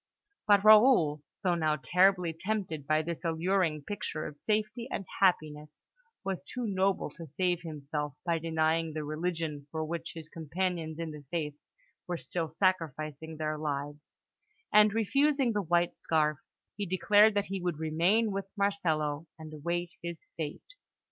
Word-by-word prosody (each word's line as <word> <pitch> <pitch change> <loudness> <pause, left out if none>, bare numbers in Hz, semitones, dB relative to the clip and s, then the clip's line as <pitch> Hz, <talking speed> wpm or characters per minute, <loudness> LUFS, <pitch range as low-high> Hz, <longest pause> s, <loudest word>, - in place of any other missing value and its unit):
But 205 -1 +6
Raoul, 215 - +6 0.2
though 180 -2 +3
now 155 -3 +1
terribly 180 +4 +3
tempted 165 -5 -3
by 155 0 +2
this 170 +2 -5
alluring 165 -2 +1
picture 160 -4 -4
of 145 - -8
safety 215 +4 -1
and 195 - -3
happiness, 150 -5 0 0.4
was 195 -2 -3
too 250 -1 -5
noble 195 -2 0
to 165 -2 -10
save 175 +4 0
himself 150 -3 -4
by 170 -2 +1
denying 160 0 +1
the 155 0 -3
religion 155 -1 -3
for 160 0 -3
which 165 +1 -5
his 160 -2 -8
companions 165 0 -3
in 165 -1 -4
the 150 -1 -9
faith 155 -4 -2 0.5
were 175 -1 -2
still 160 +5 -3
sacrificing 160 -3 -1
their 155 0 -2
lives; 145 0 -4 0.6
and, 210 0 +7
refusing 270 +4 +2
the 210 - +1
white 175 -1 +1
scarf, 150 -2 +1 0.4
he 205 -1 -3
declared 205 +4 +5
that 205 0 +1
he 195 -1 -4
would 175 -3 -1
remain 170 +8 +2
with 195 0 -3
Marcello 165 -6 0
and 155 -1 -9
await 170 +3 -2
his 170 -1 -7
fate. 160 - -6
165 Hz, 150 wpm, -30 LUFS, 155-195 Hz, 0.6 s, and